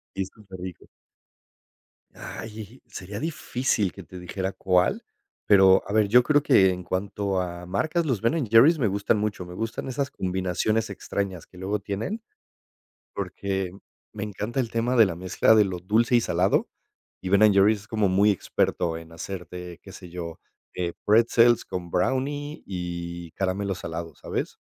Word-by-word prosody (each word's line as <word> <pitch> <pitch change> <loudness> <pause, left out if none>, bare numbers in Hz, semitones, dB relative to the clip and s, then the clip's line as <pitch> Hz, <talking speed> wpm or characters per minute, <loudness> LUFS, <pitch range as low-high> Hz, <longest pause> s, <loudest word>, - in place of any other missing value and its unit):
Y 95 - -1
es 95 - -5
súper 95 -4 -12
rico. 90 -1 -8 1.3
Ay, 110 +2 -9
sería 100 -2 -7
difícil 130 - -1
que 95 - -10
te 90 +2 -11
dijera 95 +2 -4
cuál, 90 -1 +1 0.4
pero 95 -2 +6
a - - -3
ver, 105 -1 +3
yo 125 +4 +6
creo 145 +3 +3
que 95 -9 +5
en 90 -1 -4
cuanto 95 +1 -1
a 90 -1 -5
marcas, 160 - 0
los 130 -9 0
Ben& 125 +4 +1
Jerry's 140 +9 +7
me 125 - +2
gustan 100 +2 +1
mucho, 105 -4 -2
me 90 - -9
gustan 115 +6 -4
esas 135 +1 -2
combinaciones 95 +4 -1
extrañas 95 -2 -4
que 90 - -16
luego 100 +3 -1
tienen. 115 - -4 0.9
Porque 95 -2 -3 0.4
me 105 - -4
encanta 105 +5 -4
el 120 - 0
tema 115 +2 0
de 115 -3 +7
la 90 -4 -3
mezcla 95 +5 +3
de 110 - +6
lo 90 -2 -4
dulce 110 +7 +2
y 120 - +5
salado, - - +1 0.5
y 95 - -4
Ben& 105 +2 +6
Jerry's 100 +1 +4
es 105 - -17
como 110 -4 +1
muy 100 +3 +4
experto 85 -3 -1
en 80 0 -11
hacerte, 90 0 -7
qué - - -12
sé 90 - -11
yo, 85 -2 -7 0.4
eh, 85 -2 -2
pretzels 115 +2 +5
con 90 -1 -5
brownie 145 - -1
y 85 -2 -5
caramelo 95 +1 -1
salado, 85 -2 -6
¿sabes? - - -4
100 Hz, 165 wpm, -25 LUFS, 90-115 Hz, 1.3 s, Jerry's